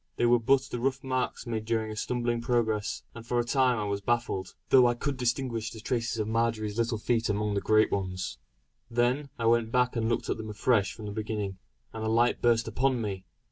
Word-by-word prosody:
They 120 - +1
were 120 0 +5
but 130 +3 +4
the 125 -3 -5
rough 135 +2 -1
marks 130 -1 -2
made 115 -2 -3
during 110 -1 -1
a - - -6
stumbling 120 +1 -1
progress; 115 -4 0
and 115 - -9
for 120 +1 -2
a 120 - +3
time 125 0 +2
I 105 - -1
was 100 -1 -2
baffled; 115 -4 -1
though 130 -2 +7
I 120 - +1
could 140 +3 -2
distinguish 120 -2 -1
the 110 - -10
traces 115 0 -2
of 105 -1 -1
Marjory's 110 -1 0
little 115 -1 +1
feet 115 +1 0
amongst 105 0 0
the 100 - 0
great 110 0 +3
ones. 95 -2 -3 0.5
Then 125 +4 +1
I 115 - -2
went 115 -1 +3
back 125 0 +2
and 115 -1 0
looked 120 - -1
at - - -1
them 110 -1 -6
afresh 105 -1 +2
from 110 - -9
the 105 - -4
beginning, 105 -3 -3 0.3
and 110 - -5
a 110 - 0
light 115 +2 +2
burst 115 -1 +3
upon 130 +3 +1
me. 100 -4 -4
115 Hz, 220 wpm, -28 LUFS, 110-120 Hz, 0.5 s, though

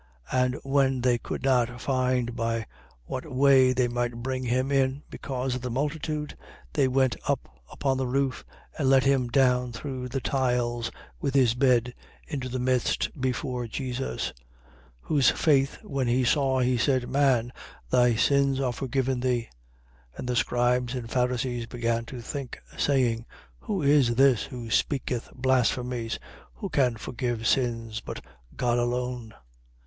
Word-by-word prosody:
5:19. 130 - +3
And 125 0 -1
when 135 -2 +2
they 120 -1 +2
could - - -5
not 125 -2 +2
find 125 -2 0
by 115 -1 -1 0.4
what - - -5
way 130 -1 +5
they 130 -1 +2
might 120 -1 -2
bring 130 0 -2
him 130 +3 0
in, 135 +1 +1
because 130 -1 -3
of 125 - -3
the 125 - -3
multitude, 150 +3 -2 0.4
they 135 - +3
went 130 -1 +2
up 60 0 -3
upon 135 -2 0
the 130 -1 -1
roof 135 +1 0 0.4
and 135 -3 +2
let 135 -1 +5
him 135 -2 +2
down 125 -1 +2
through 125 +1 -5
the 135 +2 -2
tiles 120 -3 0 0.3
with 140 -1 -2
his 125 -4 +5
bed 125 -1 +2 0.3
into 135 -4 -4
the 130 - -3
midst 125 -1 +1
before 125 -1 -2
Jesus. 130 +2 -3
5:20. - - -23 0.7
Whose 140 - +3
faith 140 -3 +2
when 135 -3 -2
he 125 +2 +2
saw, 130 0 +2
he 125 -1 +2
said: 130 -2 +1
Man, 130 -2 +2 0.4
thy 125 -2 +4
sins 140 +3 +3
are 130 -3 0
forgiven 130 0 -1
thee. 125 -2 0 0.6
5:21. - - -22
And - - -5
the 125 - 0
scribes 120 +1 +1
and 115 -2 -5
Pharisees 125 -1 0
began 115 -1 -1
to 120 +1 -8
think, 135 +1 -6 0.2
saying: 120 -5 +1 0.3
Who 200 -7 -3
is 140 -4 +4
this 135 -2 +4
who 120 -3 -7
speaketh 130 -4 0
blasphemies? 125 -2 0 0.4
Who 200 - -5
can 130 -7 +2
forgive 120 0 -3
sins, 115 -3 0
but - - -7 0.3
God 120 -1 +1
alone? 120 -1 -2
125 Hz, 155 wpm, -27 LUFS, 120-135 Hz, 0.7 s, way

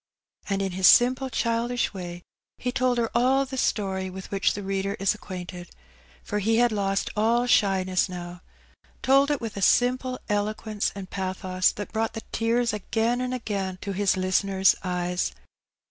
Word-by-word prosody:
And 195 0 0
in 190 - -2
his 185 +1 +3
simple 255 +2 +5
childish 235 0 0
way 175 -2 -7 0.3
he 250 - -2
told 250 -1 +1
her 230 -1 0
all 260 +3 +3
the 265 0 -7
story 190 -6 -1
with 190 +1 -9
which 195 0 +1
the 205 - -5
reader 195 +1 -2
is 195 0 +1
ac 210 - -5
quainted—for 185 +2 -8
he 225 +3 +2
had 240 0 +4
lost 195 -2 -1
all 230 +3 +2
shyness 190 -5 +2
now 175 -1 -7 0.3
— - - -33
told 275 +2 +4
it 290 -2 +1
with 225 -4 -6
a - - -3
simple 255 +5 +2
eloquence 210 0 -1
and 190 -2 -8
pathos 185 -1 0
that 205 - -7
brought 225 0 -1
the 225 - -5
tears 230 0 +1
again 225 +4 0
and 255 0 -2
again 200 -6 -3
to 200 - -4
his 195 0 +1
listener's 190 +1 +3
eyes. 180 -1 -1
205 Hz, 170 wpm, -26 LUFS, 190-235 Hz, 0.3 s, simple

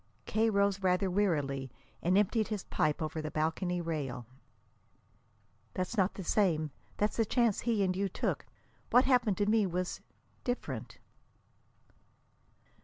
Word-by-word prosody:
K. 220 +1 +2
rose 200 -1 +2
rather 185 0 +2
wearily 145 -9 0 0.3
and 180 +3 +3
emptied 210 +2 +2
his 210 -4 -3
pipe 155 +1 0
over 155 +1 -3
the 155 - -4
balcony 170 +4 -1
rail. 145 -7 -3 1.5
"That's 185 +5 -2
not 195 -2 +2
the 195 - -5
same. 165 -5 +1 0.3
That's 210 +1 0
the 225 - +4
chance 230 -1 +2
he 225 -4 +1
and 185 -1 +1
you 195 +1 0
took. - - -2 0.4
What 250 +2 +5
happened 245 -7 +3
to 205 - +2
me 215 -1 +3
was 180 0 -3 0.4
different." 245 0 -4
190 Hz, 135 wpm, -32 LUFS, 165-210 Hz, 1.5 s, What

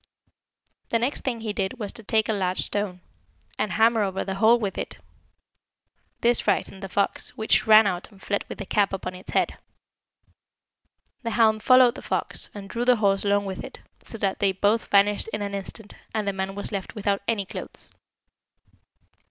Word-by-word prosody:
The 230 - +2
next 245 +5 -1
thing 240 -4 -2
he 215 -2 -3
did 195 -2 -2
was 205 -3 -4
to - - -9
take 220 0 +1
a 220 - +1
large 185 -2 0
stone, 200 -3 -3 0.6
and 210 -4 0
hammer 225 +2 +4
over 195 -2 -1
the 195 - -2
hole 220 +5 +5
with 205 -5 -3
it; - - -5 1.2
this 240 0 +4
frightened 195 - -1
the 195 - -6
fox, 200 +2 0
which 220 0 +2
ran 215 0 +8
out 180 -2 -2
and 200 - -18
fled 200 +1 -1
with - - -6
the 200 - -6
cap 200 0 +1
upon 185 -1 -4
its 185 +1 -12
head. - - 0 1.6
The 230 - -3
hound 220 -2 +4
followed 255 +1 +6
the - - -9
fox, - - -3
and 200 -1 -9
drew 235 +4 -2
the 250 0 +5
horse 200 -3 +2
along 205 0 +2
with 190 -1 -5
it, - - -9 0.2
so 225 - -4
that 195 -3 -1
they 195 -1 +2
both 205 +4 +1
vanished 205 +1 +3
in 210 - -2
an 200 0 -4
instant, 200 +2 -6 0.2
and 215 -2 -1
the 200 - +1
man 190 0 -3
was 205 - -4
left 200 +2 -4
without 200 -1 0
any 210 -4 0
clothes. - - -7
205 Hz, 190 wpm, -25 LUFS, 195-220 Hz, 1.6 s, ran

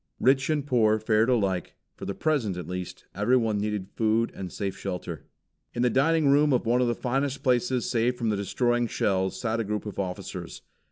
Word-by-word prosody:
Rich 135 +2 +3
and 150 -3 0
poor 110 -6 +3
fared 110 +2 +2
alike; 100 -8 0 0.2
for - - -8
the 100 - -4
present, 130 - 0
at 90 - -5
least, 90 0 -6
everyone 110 0 +2
needed 105 -2 -3
food 115 +1 +1
and 95 -2 -6
safe 100 -2 -3
shelter. 90 -6 -6 0.5
In 120 - 0
the 125 - +3
dining 155 +4 +3
room 145 +1 +4
of 125 - +1
one 120 +2 +3
of 125 - +2
the 120 - 0
finest 135 +2 -1
places 125 -2 +1
saved 120 +1 +1
from 115 -2 -1
the 105 - +1
destroying 120 +4 0
shells 95 -3 0
sat 115 -1 -1
a - - +1
group 105 +1 -3
of 105 - -6
officers. 90 -2 -5
115 Hz, 200 wpm, -27 LUFS, 100-125 Hz, 0.5 s, room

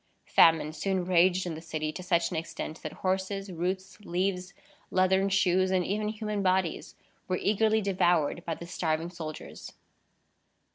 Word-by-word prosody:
Famine 160 -2 +4
soon 190 +1 -1
raged 180 +1 +3
in 175 - -3
the 160 - -7
city 155 -2 -3
to 185 - -7
such 170 -2 +1
an - - -3
extent, 160 0 -5
that - - -5
horses, 190 +1 -1
roots, 185 +2 -3
leaves, 185 -1 -2 0.3
leathern 190 +1 +3
shoes, 185 -1 +3
and 185 -2 +1
even 210 +2 -1
human 210 -1 -3
bodies, 185 -3 0 0.3
were 185 - 0
eagerly 220 +2 +2
devoured 175 -5 +1
by 165 - -3
the 170 - -9
starving 165 -1 -2
soldiers. 160 -3 -8
185 Hz, 150 wpm, -29 LUFS, 170-195 Hz, 0.3 s, Famine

